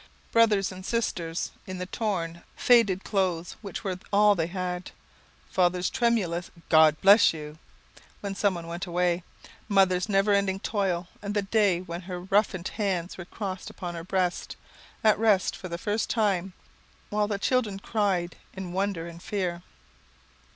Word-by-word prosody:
Brothers 215 -4 +4
and 185 0 -9
sisters, 180 -7 -2 0.2
in 185 -1 -5
the 180 - -4
torn, 180 -5 -3
faded 215 -6 +4
clothes 180 -4 -1
which 200 0 -6
were 185 -3 -3
all 210 0 +6
they 165 -4 -1
had; 180 0 -4 0.6
father's 180 0 +2
tremulous 220 -10 0 0.2
"God 155 -1 +6
bless 200 0 +7
you," 150 0 -8 0.6
when 200 -1 -3
someone 190 -4 0
went 170 +2 -5
away. 175 0 +1 0.5
Mother's 190 -1 +3
never 200 +1 +3
ending 195 -1 +1
toil, 190 -5 -1
and 205 0 -4
the 205 - +1
day 195 -3 +2
when 175 -1 -6
her 180 -1 -6
roughened 190 -1 +1
hands 190 -5 -2
were 175 - -6
crossed 190 -1 -5
upon 175 -1 -6
her 165 -1 -6
breast, 180 0 -1 0.5
at 215 -2 +4
rest 210 -4 +3
for 185 - -8
the 170 - -3
first 210 +4 -1
time, 195 -5 +1 0.6
while 210 0 +1
the 205 -1 -1
children 215 -2 0
cried 195 -5 -1 0.2
in 190 -2 -6
wonder 190 -3 -1
and 170 0 -10
fear. 180 -3 -2
190 Hz, 150 wpm, -27 LUFS, 175-205 Hz, 0.6 s, bless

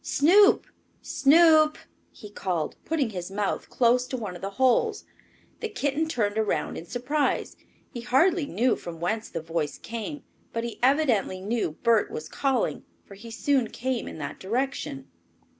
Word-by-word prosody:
"Snoop! 385 +8 +5 0.4
Snoop!" 310 +1 +5 0.3
he 210 - -12
called, 180 -6 -2
putting 290 -8 0
his 180 -2 -5
mouth 200 0 -2
close 250 +1 +2
to 260 - -4
one 205 -6 -5
of 175 - -10
the 195 - -3
holes. 400 - +2 0.5
The 450 - -3
kitten 305 -5 -1
turned 215 -6 0
around 220 - -1
in 170 - -8
surprise. 280 - -1 0.4
He 240 - -5
hardly 305 +6 +2
knew 235 +7 +1
from 165 -1 -8
whence 215 +6 -2
the 165 - -4
voice 165 -3 -3
came, 235 +6 -6 0.3
but 230 - -2
he 235 -1 -6
evidently 250 -8 +2
knew 210 -4 -2
Bert 230 -3 +3
was 155 - -6
calling, 270 -4 -1 0.2
for - - -13
he 215 +4 -11
soon 255 +1 +1
came 255 -1 -3
in - - -7
that 150 - -6
direction. 225 - -3
235 Hz, 160 wpm, -26 LUFS, 200-285 Hz, 0.5 s, Snoop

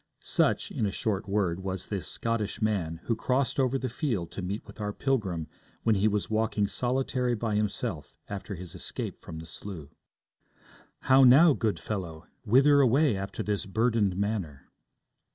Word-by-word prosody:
Such, - - +1
in 105 - 0
a - - -2
short 100 0 -2
word, 95 -4 0
was 95 -1 -5
this 95 -7 -3
'sottish 115 0 -2
man' 90 -7 -1
who 115 - 0
crossed 130 +5 0
over 130 0 +2
the 130 - -3
field 115 - -2
to - - -5
meet 100 +4 -4
with - - -11
our 105 0 -1
pilgrim 100 - -1 0.4
when 115 - +4
he 100 +1 +3
was 105 -1 0
walking 110 -1 +1
solitary 125 0 0
by 110 -1 -2
himself 105 - -2
after 100 0 -5
his 90 0 -9
escape - - -6
from 80 - -8
the 80 - -8
slough. 80 -3 -8 1.1
'How 135 +1 +6
now, 140 +6 +8
good 105 -9 -1
fellow? 85 -5 -5 0.2
Whither 140 +6 +6
away 135 0 +4
after 95 +1 -4
this 105 -2 -2
burdened 110 -2 +1
manner?' 95 -9 -3
105 Hz, 165 wpm, -28 LUFS, 95-120 Hz, 1.1 s, now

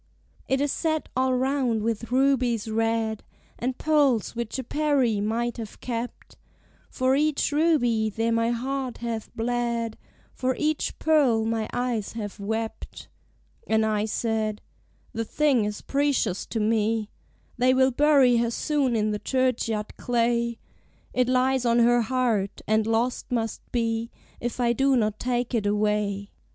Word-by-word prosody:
"It 265 - +1
is 290 -1 +1
set 315 -2 -1
all 260 0 +2
round 255 -4 0
with 230 +1 -2
rubies 255 -4 +2
red, 225 0 0 0.4
And 250 +1 -2
pearls 285 -9 +2
which 235 +1 -3
a 260 - -3
Peri, 270 -6 +1
might 235 +3 -1
have 225 -3 -8
kept. 240 0 -6 0.5
For 260 +1 +1
each 300 0 +1
ruby 270 -8 +2
there 225 +2 -1
my 230 0 +2
heart 255 +1 -2
hath 230 -2 -4
bled: 235 -1 -1 0.3
For 255 0 -1
each 305 0 -1
pearl 270 -9 +3
my 225 -1 -1
eyes 245 -4 -2
have 210 -2 -6
wept." 220 +2 -5 0.6
And 220 0 +2
I 215 -1 0
said 220 -1 -2 0.5
"The 225 - -2
thing 265 -2 +2
is 210 0 -4
precious 275 -9 0
to 225 - -3
me: 220 0 +1 0.5
They 250 +1 +4
will 260 0 +4
bury 275 -2 +4
her 235 0 +1
soon 275 0 0
in 215 -1 +1
the 210 - -2
churchyard 230 -3 -1
clay; 235 -1 0 0.6
It 250 -1 +2
lies 255 0 +2
on 235 -1 +3
her 240 0 +4
heart, 225 -4 -1
and 215 0 +2
lost 230 +3 -1
must 225 -3 -1
be 230 -1 -1 0.3
If 240 +1 -4
I 235 -1 +3
do 270 +3 +3
not 215 -2 0
take 245 0 -1
it 215 -4 +1
away." 205 -1 0
235 Hz, 145 wpm, -25 LUFS, 220-260 Hz, 0.6 s, They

